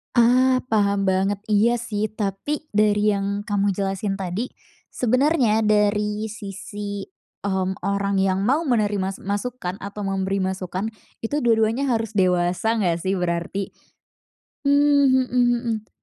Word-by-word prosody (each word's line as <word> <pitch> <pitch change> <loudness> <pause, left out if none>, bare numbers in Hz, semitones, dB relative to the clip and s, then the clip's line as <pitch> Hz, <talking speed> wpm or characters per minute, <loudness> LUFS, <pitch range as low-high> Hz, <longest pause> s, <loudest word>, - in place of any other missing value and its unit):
Ah, 255 +2 +4
paham 200 -2 +2
banget, 195 +1 +1
iya 220 +3 +4
sih, 220 -3 -2
tapi 215 +8 -3
dari 210 0 +3
yang 200 0 -1
kamu 205 -1 0
jelasin 195 0 -2
tadi, 195 +5 -3 0.4
sebenernya 255 -2 +2
dari 210 0 +1
sisi, 205 -1 -6 0.4
mmm, 190 -1 -1
orang 200 0 0
yang 190 -1 +1
mau 290 +6 +2
menerima 205 - 0
masukan 205 -2 -3
atau 200 +1 -6
memberi 195 0 -1
masukan, 190 +1 -2 0.3
itu 285 +6 -2
dua-duanya 230 +3 +2
harus 225 -2 -2
dewasa 180 +4 +2
gak 175 -5 +1
sih 190 0 0
berarti? 175 +3 -2 0.9
Mmm, 280 -2 +4
mhm 250 0 +3
mhm. 230 -3 -3
205 Hz, 125 wpm, -23 LUFS, 195-230 Hz, 0.9 s, Ah